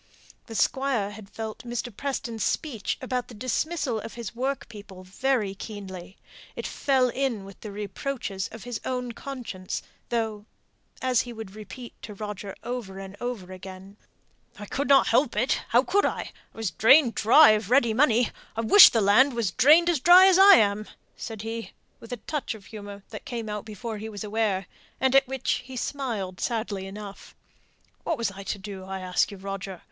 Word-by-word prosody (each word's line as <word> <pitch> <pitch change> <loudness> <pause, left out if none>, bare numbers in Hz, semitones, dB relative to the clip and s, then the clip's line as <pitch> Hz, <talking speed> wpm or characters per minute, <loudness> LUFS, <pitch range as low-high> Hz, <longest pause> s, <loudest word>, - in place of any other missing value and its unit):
The 225 - -8
Squire 245 -2 +1
had 205 -1 -11
felt 220 0 -6
Mr. 240 -1 -5
Preston's 235 -5 -3
speech 245 -10 -2
about 250 -1 -2
the 240 - -12
dismissal 255 +2 -1
of 225 - -8
his 235 -3 -6
work 265 +3 -2
people 200 -4 -11
very 210 +2 -1
keenly; 195 -3 -9 0.4
it - - -5
fell 265 -3 +1
in 245 -6 -2
with 195 -1 -13
the 210 - -8
reproaches 205 0 -4
of 225 - -10
his 245 -3 -5
own 250 -1 -3
conscience, 235 -7 -6 0.3
though, 220 -3 -2 0.6
as 255 -2 +3
he 245 - -7
would 220 -4 -8
repeat 215 +3 -10
to 210 - -8
Roger 205 -1 -6
over 230 -5 -5
and 195 0 -8
over 225 -7 -5
again, 190 +1 -10 0.6
"I 205 - -7
couldn't 275 +4 +3
help 250 0 +2
it 245 +5 +1
how 245 +2 +4
could 400 +7 +2
I? - - -4
I - - -31 0.2
was 220 -5 -2
drained 235 - +5
dry 250 +5 +7
of 215 -1 0
ready 240 -3 +4
money 245 -2 +3 0.2
I 225 - -1
wish 380 - +9
the 225 - +1
land 230 +8 +5
was 225 -6 0
drained 300 - +6
as 340 -5 +2
dry 355 +6 +8
as 380 -1 +5
I 395 0 +10
am," 210 - +2 0.3
said 220 -2 -7
he, 225 0 -5 0.3
with 230 - -13
a 245 - -3
touch 275 +1 -4
of 205 -3 -14
humour 205 -2 -9
that - - -8
came 235 -7 -5
out 210 -1 -4
before 220 0 -6
he 220 +1 -6
was 205 -2 -7
aware, 210 -3 0 0.3
and 265 0 +2
at 270 -1 +5
which 265 -1 -1
he 255 0 -9
smiled 225 -10 -3
sadly 215 -5 -2
enough. 200 0 -10 0.7
"What - - -1
was 230 -4 -1
I 195 0 -9
to 200 - -4
do, 195 -1 -8
I 190 0 -5
ask 185 -1 +1
you, 200 - -9
Roger? 195 -1 -6
225 Hz, 185 wpm, -26 LUFS, 200-255 Hz, 0.7 s, I